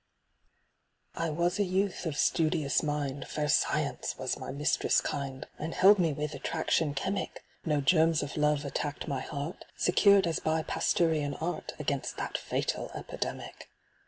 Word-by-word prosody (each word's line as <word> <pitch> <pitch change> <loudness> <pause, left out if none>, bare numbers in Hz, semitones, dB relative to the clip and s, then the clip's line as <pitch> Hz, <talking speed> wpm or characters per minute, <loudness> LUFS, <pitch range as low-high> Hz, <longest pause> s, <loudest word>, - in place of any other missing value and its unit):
I 165 0 -2
WAS 170 +5 0
a - - +4
youth 190 -1 -1
of 150 -3 -3
studious 155 -5 +2
mind, 145 -2 -2
Fair 150 -1 -2
Science - - +1
was - - -2
my - - -6
mistress 145 +3 +2
kind, 135 0 -4
And 160 +2 -4
held 200 +2 +7
me 165 -3 +3
with 150 +1 -3
attraction 145 +2 0
chemic; 190 +6 -3 0.2
No 150 -3 +1
germs 160 +1 +4
of 145 - -6
Love 150 -1 +2
attacked 145 +1 -3
my 135 -2 -1
heart. 145 +4 -5
Secured 200 +1 +5
as 165 -1 0
by 160 0 0
Pasteurian 155 -5 +1
art 165 0 -4
Against 140 -2 -2
that - - -4
fatal - - -2
epidemic. - - -6
155 Hz, 150 wpm, -30 LUFS, 145-170 Hz, 0.2 s, held